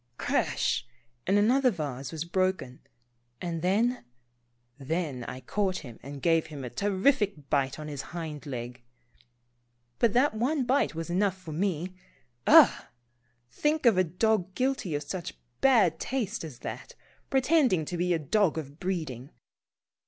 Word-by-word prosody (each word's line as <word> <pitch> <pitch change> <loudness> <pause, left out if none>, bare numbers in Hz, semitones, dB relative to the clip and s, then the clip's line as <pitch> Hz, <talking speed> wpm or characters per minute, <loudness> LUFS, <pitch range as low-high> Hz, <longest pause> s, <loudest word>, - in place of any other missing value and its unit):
" - - -43
Crash," 120 - 0 0.4
and 195 +2 +4
another 250 +6 +4
vase 140 - -4
was 160 0 -4
broken, 185 -7 -1 0.6
and 170 -2 -3
then 220 +8 +1 0.4
— 120 0 -44
then, 145 -3 -2
I 130 +2 -7
caught 190 +7 -1
him 120 -3 -11
and 140 +2 -9
gave 165 -1 +3
him 145 -4 -8
a 125 - -6
terrific 200 - +1
bite 135 -2 +1
on 155 -1 -7
his 145 -3 -5
hind 160 -3 -7
leg. 125 -2 -6 1.2
But 230 -3 +3
that 260 +2 +3
one 260 +6 0
bite 260 - +1
was 165 +1 -4
enough 190 +1 +1
for 185 -4 -9
me. 180 +1 -1 0.5
Ugh! - - +7 0.7
Think 300 - 0
of 230 -4 +6
a 185 - +4
dog 185 +2 0
guilty 255 - 0
of 145 - -2
such 170 +3 -5 0.3
bad 215 -12 +4
taste 250 -10 -2
as 150 -7 -8
that, - - -7 0.3
pretending 265 - +3
to 175 - -4
be 180 +1 0
a - - +1
dog 165 +3 +1
of 145 0 -6
breeding. 155 -9 -3
175 Hz, 150 wpm, -28 LUFS, 145-210 Hz, 1.2 s, Ugh